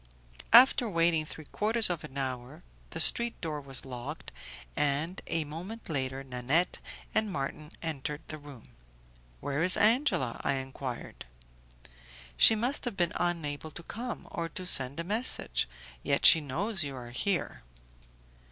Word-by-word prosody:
After 245 0 +7
waiting 165 -3 +2
three 155 0 -9
quarters 220 +7 +4
of 175 -3 -2
an 135 - -9
hour 130 +4 -5 0.3
the 160 - -6
street 235 +8 +3
door 155 -3 -4
was 135 -1 -1
locked, 125 -2 -8 0.4
and 150 +5 -1
a 165 - -1
moment 175 +10 -8
later 135 -2 -3
Nanette 135 +7 0 0.3
and 220 -1 +1
Marton 150 -1 -5
entered 150 -2 -4
the 155 - -6
room. 145 -5 -13 0.7
"Where 140 +2 -2
is 180 +2 +5
Angela?" 215 - +2
I - - +1
enquired. 130 -2 -7 1.1
"She 220 - +7
must 245 +6 -1
have 240 -5 -4
been 175 -3 +1
unable 160 -4 -2
to 170 +3 -10
come, 240 +6 -6
or 165 -1 -4
to 185 +4 -7
send 135 -4 +4
a - - -2
message. 215 - 0 0.3
Yet - - 0
she 160 - +9
knows 185 - -1
you 140 -3 -3
are 120 -2 -9
here." 180 +9 -2
160 Hz, 145 wpm, -29 LUFS, 135-190 Hz, 1.1 s, she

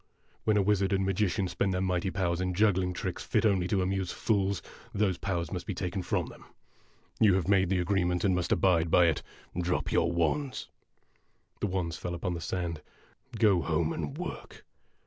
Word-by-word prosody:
When 110 -1 +3
a 100 - +3
wizard 100 -1 +2
and 95 0 +1
magician 95 0 0
spend 90 +2 -1
their - - 0
mighty 90 0 0
powers 90 -2 -1
in 90 -1 -1
juggling 95 -3 +2
tricks 90 - -4
fit - - +1
only 95 -4 +2
to 95 -1 +1
amuse 95 -1 -1
fools, 100 -3 0 0.3
those 95 -4 +1
powers 85 -3 -2
must 90 -2 -5
be 100 - -3
taken 90 +1 -3
from - - -1
them. - - -12
A - - -16
DUEL - - -20
IN - - -25
A - - -26
DESERT - - -36
51 110 - +6
You 95 - +4
have 95 -2 0
made 95 -2 +3
the 95 -2 +2
agreement, 90 -1 +1
and 95 -2 +3
must 90 -1 -1
abide 85 -2 +3
by 90 +2 +5
it. 80 -4 +1 0.3
Drop 90 +1 -1
your 85 - +2
wands! 85 - -1 0.4
' - - -41
The - - +1
wands 90 -3 -2
fell 90 -1 -4
upon 90 +1 -2
the 85 - -5
sand. 85 -2 -3 0.3
" 130 -4 -14
Go 105 -5 +4
home, 80 0 0
and 75 -4 -4
work - - -7
90 Hz, 220 wpm, -29 LUFS, 85-100 Hz, 0.4 s, 51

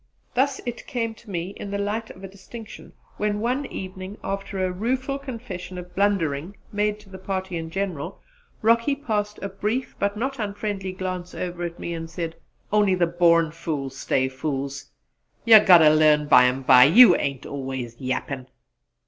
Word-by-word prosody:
Thus 270 +2 +1
it 240 -1 -6
came 230 -2 -2
to 225 0 -17
me 175 -1 -3
in 200 - -6
the 200 - -2
light 210 +3 -2
of 185 - -12
a - - -5
distinction 200 +4 -11 0.2
when 210 0 -1
one 255 +5 -1
evening, 185 +1 -7
after 195 0 -4
a 185 - -1
rueful 260 +8 -2
confession 220 -9 -7
of 180 0 -9
blundering 190 -3 0
made 210 0 0
to 205 - -19
the 190 0 -10
party 190 -1 -4
in 165 -1 -4
general, 180 -5 -4 0.4
Rocky 230 +5 +3
passed 210 -6 -2
a - - -1
brief 210 +6 -3
but 200 +1 0
not 265 +4 -3
unfriendly 205 -2 -3
glance 185 -1 -5
over 175 -1 -3
me 170 - -5
and 165 -1 -6
said, 165 -1 -5 0.4
"On'y 205 -3 +4
the 180 -1 +2
born 170 -1 +3
fools 145 -5 -4
stays 130 -1 0
fools. 140 0 -4 0.6
You'll 225 -2 +10
git 180 -2 +9
ter 155 -1 +7
learn 150 -1 +4
bymbye; 130 -1 +6
you 245 +5 +9
ain't 140 -2 -3
always 130 -4 -5
yappin'!" 130 0 -3
190 Hz, 165 wpm, -24 LUFS, 165-210 Hz, 0.6 s, You'll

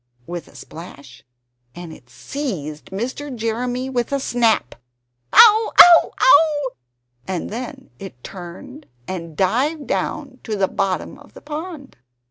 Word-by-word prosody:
with 175 0 -7
a - - -19
splash 140 -6 -12 0.5
and 175 -2 -9
it 120 - -17
seized 155 - -6
Mr. 255 +7 -5
Jeremy 245 +3 -2
with 245 -2 -2
a 280 - 0
snap, 235 - +1 0.6
"Ow! 440 0 +7
Ow! 345 -1 +9
Ow!" 290 +1 +4 0.6
and 185 0 -4
then 255 +4 -7
it 185 -11 -11
turned 195 - -10 0.2
and 165 -4 -7
dived 280 - 0
down 270 -3 -3
to 220 - -4
the 195 -1 +1
bottom 190 -1 -3
of - - -19
the - - -12
pond! 300 - -8
245 Hz, 130 wpm, -20 LUFS, 180-280 Hz, 0.6 s, Ow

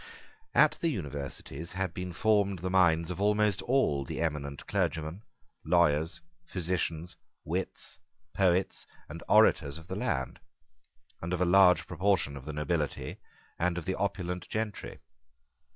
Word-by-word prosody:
At - - +5
the 170 - +2
Universities 75 - -5
had 95 -2 -2
been 90 -1 -5
formed 100 +1 +2
the 90 +2 -4
minds 85 -2 +3
of 90 - -5
almost 105 -1 +2
all 95 - +2
the - - -6
eminent 75 -4 -3
clergymen, 80 +4 -1 0.4
lawyers, 80 -2 +2 0.3
physicians, 85 -2 -3 0.3
wits, - - -4 0.3
poets, 95 -1 +1 0.2
and - - -8
orators 70 0 +4
of 80 - -12
the 95 +1 -5
land, 90 - -2 0.8
and 85 +2 -3
of 90 - -1
a 90 - +3
large 90 0 +6
proportion 90 -4 +1
of 70 -1 -9
the 75 - -5
nobility 75 -1 -2 0.4
and 90 0 +1
of 90 - -4
the 95 - 0
opulent 90 -2 -3
gentry. 110 -2 -4
90 Hz, 135 wpm, -30 LUFS, 80-95 Hz, 0.8 s, large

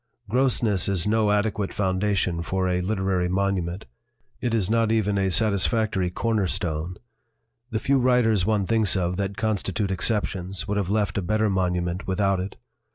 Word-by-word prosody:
Grossness 110 -5 +1
is 95 -4 0
no 110 0 +2
adequate 105 -1 0
foundation 95 -3 0
for 95 +2 -1
a 90 0 0
literary 95 -2 0
monument; 95 -1 -1 0.5
it 120 -1 -1
is 110 -5 +1
not 115 0 +2
even 105 -2 +1
a 95 -1 +1
satisfactory 105 -1 +1
corner 110 +1 0
stone. 85 +1 -3 0.7
The 115 - -2
few 135 +4 +2
writers 120 -6 +3
one 105 0 +1
thinks 110 -2 +2
of 90 -1 -1
that 100 0 -3
constitute 105 -2 -1
exceptions 95 -2 -1
would 105 0 -1
have 100 -3 -1
left 100 -1 0
a - - -2
better 110 +3 +1
monument 90 -1 -1
without 95 0 +1
it. 95 +2 -5
100 Hz, 160 wpm, -24 LUFS, 95-110 Hz, 0.7 s, writers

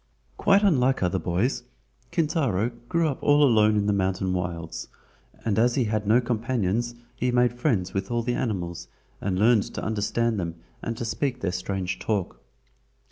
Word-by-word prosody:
Quite 200 +1 +4
unlike 135 - +3
other 90 - +1
boys, 110 +9 0 0.5
Kintaro, 140 - 0 0.2
grew 170 -1 +2
up 140 - -3
all 145 0 +5
alone 110 -5 +5
in 105 -1 +1
the 105 - +2
mountain 95 -1 0
wilds, 85 -2 -4 0.6
and 110 -1 +1
as 120 +1 +3
he 130 - +2
had 105 -2 -1
no 115 +4 +5
companions 120 -1 -1 0.2
he 125 - 0
made 125 0 +3
friends 120 - 0
with 95 0 -2
all 120 0 0
the 120 +1 -1
animals 95 -9 -3 0.3
and 95 -2 -1
learned 110 +1 +4
to - - -4
understand 110 +1 0
them 85 -2 -3 0.3
and 115 -1 -4
to 120 - -3
speak 130 +2 -2
their 95 - 0
strange 95 -1 -3
talk. 100 -2 -2
110 Hz, 170 wpm, -26 LUFS, 95-125 Hz, 0.6 s, all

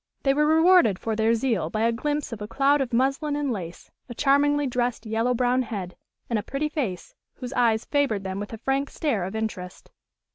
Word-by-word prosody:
They 270 - +3
were 300 +2 +2
rewarded 320 - +5
for 225 +2 -3
their 225 +1 +2
zeal 225 -9 0
by 215 - -2
a 230 +1 +3
glimpse 290 +4 -2
of 215 - -8
a 210 - -4
cloud 275 +4 +2
of 260 - -2
muslin 275 +5 0
and 290 -2 -1
lace, 175 -6 -7 0.2
a 240 - -7
charmingly 290 +2 +3
dressed 245 -2 -2
yellow 225 +3 0
brown 250 +1 +2
head, 195 -7 -5 0.3
and 230 -3 0
a - - -3
pretty 280 +7 -3
face, 235 - -4 0.2
whose 250 +1 -7
eyes 230 -3 +2
favored 275 -9 0
them 190 0 -4
with 205 - -6
a 225 - -6
frank 270 +4 -1
stare 230 - -1
of 190 +4 -6
interest. 200 -5 -5
245 Hz, 210 wpm, -25 LUFS, 220-280 Hz, 0.3 s, rewarded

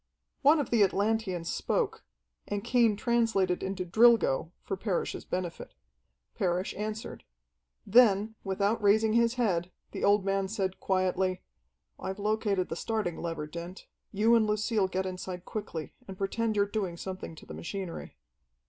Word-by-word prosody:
One 295 +3 +6
of 285 - -2
the 230 -3 +4
Atlanteans 195 -3 0
spoke, 450 -2 -1 0.4
and 205 -1 -3
Cain 235 -4 +3
translated 225 -5 +1
into 190 -1 -3
"Drilgo" 210 - +4
for - - -3
Parrish's 190 -2 -2
benefit. 180 - -5 0.6
Parrish 180 +1 -1
answered. 215 +2 -5 0.6
Then, 215 -1 +5
without 200 +3 0
raising 215 +2 +4
his 235 +1 +3
head, 185 -8 0 0.2
the - - -5
old 200 -1 +4
man 195 0 +1
said 190 -2 -2
quietly, 185 -1 0 0.6
"I've 190 +1 -4
located 210 -2 0
the - - -3
starting 210 -3 -2
lever, 165 -3 -3
Dent. 170 +4 -8 0.3
You 220 +3 +3
and 225 -2 +4
Lucille 210 -1 +1
get 190 0 -2
inside 185 -1 -5
quickly 185 -7 -5
and 190 -1 -8
pretend 215 +3 -1
you're 200 -1 +3
doing 200 -4 -3
something 185 -2 -6
to - - -13
the - - -9
machinery." 185 -1 -6
200 Hz, 145 wpm, -29 LUFS, 185-220 Hz, 0.6 s, One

